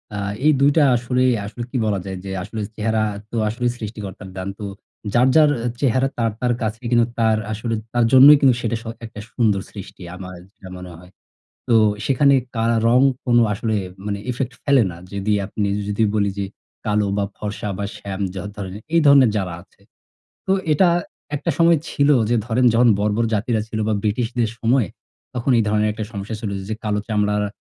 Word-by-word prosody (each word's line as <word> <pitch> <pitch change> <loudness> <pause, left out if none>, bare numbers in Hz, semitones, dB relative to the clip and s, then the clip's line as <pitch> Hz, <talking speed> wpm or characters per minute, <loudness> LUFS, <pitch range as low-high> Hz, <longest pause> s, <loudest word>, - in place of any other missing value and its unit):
আ - - -3 0.3
এই 155 - +7
২ 140 +1 +5
টা 155 - +6
আসলেই 125 +1 +1
আসলে 115 +4 -6
কি 135 - -1
বলা 100 -3 0
যায় 95 -1 -5
যে 95 - -5
আসলে 105 +2 -6
চেহারা 110 0 0 0.3
তো 120 - -3
আসলে 120 +3 -2
সৃষ্টিকর্তার 105 -3 -7
দান। 95 - -4
তো 105 - -5 0.5
যার, 125 +2 +4
যার 155 -2 +6 0.2
আ - - +1
চেহারা 130 0 +2
তার, 115 -2 +1
তার 125 -1 +2
কাছেই 110 +2 -3
কিন্তু 120 -1 +4
তার 110 -1 +3
আসলে 115 +2 -2 0.2
তার 120 -1 +3
জন্যই 140 +3 +9
কিন্তু 130 -4 +5
সেটা 115 0 -1
স - - -22 0.2
একটা 110 -1 -10
সুন্দর 105 -5 +1
সৃষ্টি, 100 -2 -10
আমার 90 -1 -8 0.2
যেটা 95 - -13
মনে 90 0 -9
হয়। 90 +2 -16 0.6
তো 120 - +3 0.3
সেখানে 140 +1 +4 0.2
কা 115 - 0 0.2
রং 125 +2 +5 0.2
কোন 120 -2 +3 0.2
আসলে 110 +2 -2 0.3
মানে 100 -1 -2
effect 125 +1 -3
ফেলে 140 -4 +4
না। 85 - -10 0.2
যদি 100 +1 -1
আপনি 100 +1 -2 0.2
যদি 105 +2 0
বলি 100 -1 +2
যে, 100 - -1 0.4
"কালো 105 -1 +1
বা, 100 - +1
ফর্সা 105 0 -4
বা, 100 - -3
শ্যাম 100 -1 -6 0.2
যা 95 - -4
ধরনে 95 -1 -6 0.2
এই 165 - +5
ধরনের 140 -4 +7
যারা 95 -3 -2
আছে। 95 - -26 0.7
তো - - +2 0.2
এটা 180 +4 +4 0.5
একটা 145 - -1
সময় 170 0 +5
ছিল 140 0 +2 0.2
যে 120 - +3
ধরেন, 120 +2 +1
যখন 120 +1 +5
বর্বর 105 +2 +1
জাতিরা 110 +1 0
ছিল 110 - -4
বা 110 - +1
ব্রিটিশদের 115 +1 0
সময়ে, 115 -3 +2 0.5
তখন 125 +2 0
এই 115 - +3
ধরনের 105 0 +2
একটা 110 - -4
সমস্যা 100 +1 -5
ছিল 105 -4 -3 0.2
যে 110 - -1
কালো 105 -1 0
চামড়ারা 105 -1 0
110 Hz, 190 wpm, -21 LUFS, 105-125 Hz, 0.7 s, জন্যই